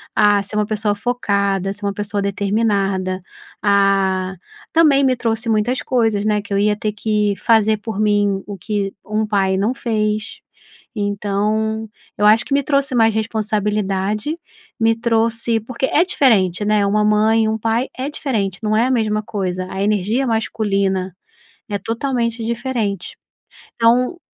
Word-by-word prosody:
a 205 -1 +4
ser 205 +2 -6
uma 210 0 +1
pessoa 210 -1 -1
focada, 200 -4 0
ser 205 0 -8
uma 200 - -1
pessoa 205 0 -3
determinada, 200 -2 0 0.4
ah, 195 -2 +2 0.4
também 300 -4 +4
me 260 -1 +3
trouxe 230 -1 -2
muitas 220 +4 +1
coisas, 225 -5 +1
né, 210 -1 +1
que 200 0 -7
eu 200 - +2
ia 210 0 +2
ter 215 0 -2
que 210 -1 0
fazer 220 -1 +3
por 215 -1 -6
mim 205 -2 +2
o 200 -1 -6
que 200 0 -3
um 215 +1 -1
pai 195 -2 +1
não 215 +6 +1
fez. 215 -3 -2 0.6
Então 210 +2 -1 0.3
eu 210 - +2
acho 215 +1 +5
que - - -3
me 280 - +3
trouxe 275 -1 0
mais 225 -1 +4
responsabilidade, 210 +2 -1 0.4
me 225 0 +3
trouxe 230 0 0
porque 255 +3 -3
é 320 - +3
diferente, 210 - +2
né, 210 -1 +2
uma 210 +1 +2
mãe 215 +1 +3
e - - +1
um 220 - -1
pai 230 +4 0
é 265 +3 -3
diferente, 205 -11 -2
não 215 0 +1
é 230 - +3
a - - 0
mesma 215 -3 0
coisa, 185 -3 -3
a 190 - -4
energia 215 +6 0
masculina 195 -5 -1 0.5
é 205 - -2
totalmente 235 0 -2
diferente, 230 -5 -3 0.6
então 250 +8 +2
215 Hz, 155 wpm, -19 LUFS, 200-230 Hz, 0.6 s, acho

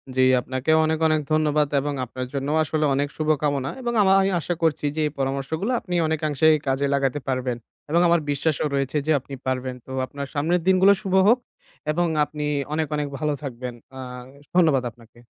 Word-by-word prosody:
জি, 130 - +3 0.2
আপনাকে 130 +4 -2
অনেক, 160 0 0
অনেক, 155 -1 +2
ধন্যবাদ 150 -1 +2
এবং 145 +1 -2
আপনার 125 +1 -6
জন্যও 140 +2 -1
আসলে 155 0 0
অনেক 140 +1 +1
শুভকামনা 145 -3 0
এবং 240 -1 -2
আমা 190 -1 +5
আমি 195 - +2
আশা 170 +3 -2
করছি 155 -2 +1
যে 160 - -1
এই 150 - -5
পরামর্শগুলো 140 - -2
আপনি 180 - -7
অনেকাংশে 155 -2 0 0.2
কাজে 135 +1 +1
লাগাতে 140 0 0
পারবেন 130 -2 -1 0.3
এবং 170 +3 +3
আমার 170 0 +4
বিশ্বাসও 150 +1 0
রয়েছে 135 +2 -1
যে 155 - +3
আপনি 135 +2 -12
পারবেন। 130 -1 -2
তো - - -11
আপনার 140 +1 -7
সামনের 165 +4 +1
দিনগুলো 190 +1 +6
শুভ 195 -3 -4
হোক 240 +3 +5 0.5
এবং 175 +3 +1 0.2
আপনি 150 0 -6 0.3
অনেক 155 -1 0
অনেক 150 -1 -1
ভালো 150 +1 0
থাকবেন। 125 -2 -5 0.2
আ - - -7 0.6
ধন্যবাদ 155 -8 +4
আপনাকে। 115 0 -20
150 Hz, 180 wpm, -23 LUFS, 135-160 Hz, 0.6 s, দিনগুলো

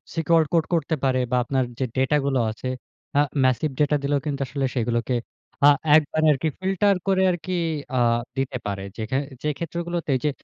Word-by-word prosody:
Secure 165 0 +3
code 165 -2 +3
করতে 160 -1 +1
পারে 130 -1 +2
বা - - +2
আপনার 130 +1 0 0.2
যে 130 - +1
ডেটা 135 +3 +3
গুলো 135 -2 +1
আছে, 115 +4 -7 0.5
আ - - +7 0.2
ম্যাসিভ 130 +3 +2
ডাটা 150 0 +3
দিলেও 140 0 +1
কিন্তু 140 -2 -2
আসলে 135 +2 -2
সেগুলোকে 120 +1 0 0.5
আ - - +10 0.3
একবারে 155 +1 0
আরকি 140 +3 -2
ফিল্টার 195 +1 +2
করে 190 -1 +3
আরকি 175 +1 -5 0.5
আ - - +3 0.4
দিতে 135 -1 -1
পারে। 100 -1 -3
যে - - -4
খে 130 - +2 0.3
যে - - 0
ক্ষেত্রগুলোতে 170 -2 -3
যে 150 - +2
145 Hz, 180 wpm, -24 LUFS, 130-165 Hz, 0.5 s, আ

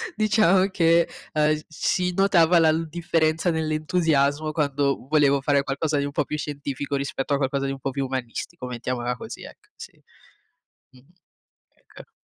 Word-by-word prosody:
diciamo 210 -3 +3
che, 170 -1 +3 0.3
ehm, 155 0 +2
si 180 +3 -1
notava 180 -3 +4
la 160 -1 +5
l 160 0 -2
differenza 165 0 0
nell'entusiasmo 155 -2 0
quando 140 -3 0
volevo 140 -2 +3
fare 140 0 +2
qualcosa 145 +2 -2
di 140 - -1
un 145 - -4
po' - - 0
più 150 - -4
scientifico 145 -1 -4
rispetto 140 +1 -2
a - - +1
qualcosa 140 0 -1
di - - -2
un 135 - -6
po' 135 - -3
più 135 0 -2
umanistico, 130 +3 -5
mettiamola 125 0 -3
così, - - -9
ecco, - - -14
sì. - - -10 1.0
Mh-mh, 130 +2 -21 0.9
ecco. - - -13
150 Hz, 155 wpm, -24 LUFS, 140-165 Hz, 1.0 s, la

